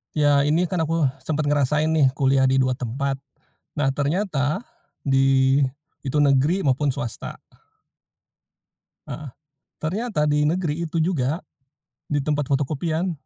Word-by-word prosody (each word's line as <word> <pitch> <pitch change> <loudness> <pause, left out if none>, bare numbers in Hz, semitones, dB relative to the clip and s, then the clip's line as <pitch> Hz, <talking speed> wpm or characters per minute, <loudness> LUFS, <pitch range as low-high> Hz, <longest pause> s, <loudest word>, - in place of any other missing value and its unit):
Ya 145 -1 +4
ini 160 +4 +2
kan 180 - -1
aku, 160 -3 +1 0.2
sempet 155 -1 0
ngerasain 150 +2 +2
nih 155 -4 +4
kuliah 135 -2 +3
di 130 - +2
2 130 - +1
tempat. 135 +3 -2 0.6
Nah 145 -2 +1
ternyata, 150 - -1 0.4
di 135 0 +3 0.5
itu 150 +3 0
negeri 145 +7 +3
maupun 135 0 +1
swasta. 120 -5 -5 1.7
Heeh, 150 -2 -6 0.5
ternyata 180 -1 -1
di 150 0 +2
negeri 170 0 0
itu 165 0 -2
juga, 160 -2 0 0.7
di 145 -1 0
tempat 145 -2 -1
fotokopian 155 +5 -1
145 Hz, 120 wpm, -23 LUFS, 135-160 Hz, 1.7 s, Ya